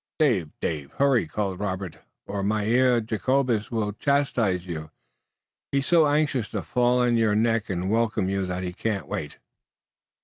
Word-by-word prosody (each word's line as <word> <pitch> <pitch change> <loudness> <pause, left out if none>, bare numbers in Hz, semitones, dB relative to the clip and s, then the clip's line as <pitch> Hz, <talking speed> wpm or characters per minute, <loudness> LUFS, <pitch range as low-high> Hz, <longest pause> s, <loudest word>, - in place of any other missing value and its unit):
"Dave! 115 - +2
Dave! 75 -3 -3
Hurry!" 135 - +2
called 95 +1 -3
Robert, 95 -4 -4 0.3
"or 100 -1 -3
Mynheer 115 +4 +2
Jacobus 115 +1 0
will 110 -3 -1
chastise 115 -8 +1
you. 80 -3 -6 0.8
He's 140 -1 +1
so 165 -3 +5
anxious 145 -6 +1
to - - -4
fall 125 0 +2
on 120 -1 +3
your 110 -2 +2
neck 115 0 +1
and 90 -1 -2
welcome 110 -3 +1
you 95 -1 -1
that 90 0 -3
he 90 -1 -4
can't 100 -1 -3
wait!" 75 - -5
110 Hz, 150 wpm, -25 LUFS, 95-125 Hz, 0.8 s, so